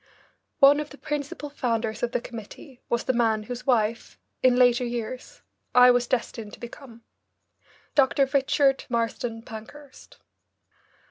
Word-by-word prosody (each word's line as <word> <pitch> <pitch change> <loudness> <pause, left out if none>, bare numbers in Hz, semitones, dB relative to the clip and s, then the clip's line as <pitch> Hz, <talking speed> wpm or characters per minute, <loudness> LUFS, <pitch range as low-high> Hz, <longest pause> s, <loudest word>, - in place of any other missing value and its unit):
One 280 +1 +7
of 300 0 -4
the 290 - -13
principal 295 0 -5
founders 230 -5 -2
of 240 - -1
the - - 0
committee 240 +4 -11
was 235 0 0
the 260 - 0
man 225 -3 +1
whose 245 +3 -7
wife, 230 -2 0 0.2
in 255 -1 +4
later 245 0 +4
years, 240 +1 -6 0.3
I 250 0 +8
was 245 0 +1
destined 230 -4 -3
to - - -11
become, 235 -1 -11 0.9
Dr. 275 0 +3
Richard 270 0 +2
Marsden 230 -1 -2
Pankhurst. 250 +6 -12
245 Hz, 135 wpm, -25 LUFS, 230-270 Hz, 0.9 s, I